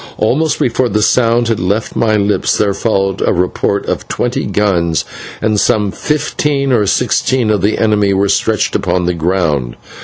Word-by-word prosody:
Almost 150 Hz, +8 st, +1 dB
before 125 Hz, +1 st, 0 dB
the 105 Hz, -1 st, 0 dB
sound 120 Hz, 0 st, +2 dB
had 115 Hz, -2 st, 0 dB
left 100 Hz, +5 st, -2 dB
my 110 Hz, -2 st, +1 dB
lips, 105 Hz, 0 st, +1 dB
there 100 Hz, -1 st, +1 dB
followed 95 Hz, -3 st, -1 dB
a -, -, +2 dB
report 90 Hz, +2 st, -1 dB
of -, -, -3 dB
twenty -, -, -2 dB
guns, 85 Hz, -6 st, 0 dB, 0.4 s
and 110 Hz, -1 st, +1 dB
some 105 Hz, -1 st, +1 dB
fifteen 145 Hz, -1 st, -1 dB
or 110 Hz, -5 st, +2 dB
sixteen 120 Hz, +3 st, +1 dB
of 105 Hz, -3 st, 0 dB
the 105 Hz, +3 st, +1 dB
enemy 105 Hz, -2 st, +2 dB
were 100 Hz, +1 st, +1 dB
stretched 110 Hz, +2 st, 0 dB
upon 90 Hz, -2 st, 0 dB
the 90 Hz, -, 0 dB
ground. 80 Hz, -7 st, -1 dB
105 Hz, 165 wpm, -14 LUFS, 95-115 Hz, 0.4 s, sound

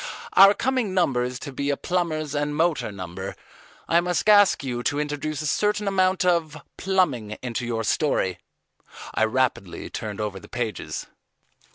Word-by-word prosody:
"Our 195 Hz, +1 st, +8 dB
coming 245 Hz, -6 st, 0 dB
number 140 Hz, -9 st, +2 dB
is 125 Hz, +1 st, -2 dB
to 140 Hz, -, -6 dB
be 140 Hz, +2 st, -2 dB
a 140 Hz, -, +1 dB
Plumbers' 155 Hz, -5 st, -1 dB
and 145 Hz, 0 st, -1 dB
Motor 160 Hz, -7 st, +1 dB
Number. 95 Hz, 0 st, -6 dB, 0.5 s
I 170 Hz, +1 st, +4 dB
must 180 Hz, +2 st, -1 dB
ask 205 Hz, -6 st, +6 dB
you 125 Hz, -3 st, -3 dB
to 145 Hz, +4 st, 0 dB
introduce 150 Hz, +1 st, -3 dB
a -, -, -4 dB
certain 210 Hz, +6 st, +1 dB
amount 185 Hz, -2 st, +2 dB
of 165 Hz, -4 st, +1 dB, 0.2 s
plumbing 145 Hz, -, 0 dB
into 120 Hz, -1 st, -3 dB
your 115 Hz, -1 st, -1 dB
story." 105 Hz, -, 0 dB, 0.7 s
I 110 Hz, -, +3 dB
rapidly 115 Hz, -6 st, -1 dB
turned 105 Hz, -1 st, -5 dB
over 105 Hz, -2 st, -3 dB
the -, -, -14 dB
pages. 120 Hz, -3 st, -4 dB
145 Hz, 160 wpm, -24 LUFS, 120-180 Hz, 0.7 s, Our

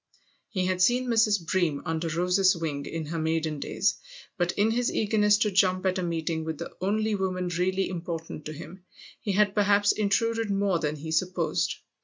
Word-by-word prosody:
He 185 Hz, -3 st, -1 dB
had 185 Hz, 0 st, 0 dB
seen 245 Hz, +6 st, +3 dB
Mrs. 215 Hz, -5 st, +3 dB
Bream, 160 Hz, -5 st, 0 dB
under 165 Hz, 0 st, -2 dB
Rose's 180 Hz, +3 st, +2 dB
wing, 145 Hz, -4 st, -3 dB
in 165 Hz, -1 st, -4 dB
her 165 Hz, +2 st, -4 dB
maiden 160 Hz, -1 st, -1 dB
days; -, -, 0 dB, 0.4 s
but 175 Hz, -3 st, 0 dB
in 210 Hz, +2 st, +2 dB
his 245 Hz, +1 st, 0 dB
eagerness 210 Hz, -1 st, +3 dB
to 210 Hz, -1 st, +1 dB
jump 185 Hz, -1 st, +2 dB
at 185 Hz, 0 st, +1 dB
a -, -, -1 dB
meeting 165 Hz, -2 st, -2 dB
with 160 Hz, -1 st, -4 dB
the 170 Hz, -, -7 dB
only 215 Hz, +3 st, 0 dB
woman 185 Hz, -2 st, -1 dB
really 185 Hz, +3 st, 0 dB
important 165 Hz, -3 st, -6 dB
to 155 Hz, -, -5 dB
him 180 Hz, +4 st, -10 dB, 0.4 s
he 205 Hz, -, -2 dB
had 205 Hz, 0 st, +3 dB
perhaps 205 Hz, -1 st, +3 dB
intruded 225 Hz, +2 st, 0 dB
more 195 Hz, -3 st, +1 dB
than 150 Hz, -1 st, -1 dB
he 160 Hz, +2 st, -7 dB
supposed. 175 Hz, +1 st, 0 dB
185 Hz, 185 wpm, -27 LUFS, 165-205 Hz, 0.4 s, seen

